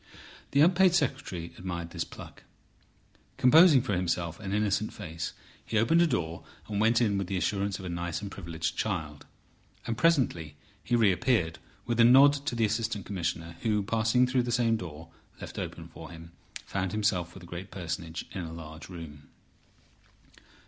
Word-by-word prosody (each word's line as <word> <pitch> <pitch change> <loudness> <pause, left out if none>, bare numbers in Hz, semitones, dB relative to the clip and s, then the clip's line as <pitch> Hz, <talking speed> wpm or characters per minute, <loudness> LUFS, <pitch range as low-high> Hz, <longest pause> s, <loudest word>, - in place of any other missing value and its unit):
The 140 - +3
unpaid 180 +2 +5
secretary 90 - -2
admired 85 -2 -5
this - - -2
pluck. - - -12 1.0
Composing 150 0 +7
for 125 - -2
himself 85 -2 -1
an 95 - -5
innocent 105 +1 0
face, 85 -5 -6 0.3
he 110 - -2
opened 160 +11 +4
a 170 - +5
door, 85 - -2 0.2
and 105 -1 -1
went 115 +2 +4
in 100 -4 +2
with 95 - -3
the 95 - -2
assurance 100 +1 -1
of 95 - -9
a - - -4
nice 85 -1 -3
and 100 -2 -7
privileged 85 -4 -4
child. 80 -9 -3 0.6
And 115 - -2
presently 120 - +1 0.3
he 120 - +1
reappeared, 110 -5 +2 0.3
with 120 0 -1
a - - +8
nod 135 +4 +8
to 120 - -1
the 115 -1 +2
Assistant 110 -2 -2
Commissioner, 85 -3 -3
who 105 -2 +1
passing 115 +4 +2
through 125 0 +1
the 120 0 -3
same 115 -1 +2
door 80 -5 -7 0.3
left - - -7
open - - -6
for - - -11
him, 85 0 -11 0.3
found 95 -2 -2
himself 95 -5 0
with 95 - -10
the - - -11
great 90 +3 -7
personage 85 -2 -5
in 95 - -4
a 80 -2 -6
large 80 0 -9
room. 80 -5 -10
100 Hz, 170 wpm, -29 LUFS, 85-115 Hz, 1.0 s, a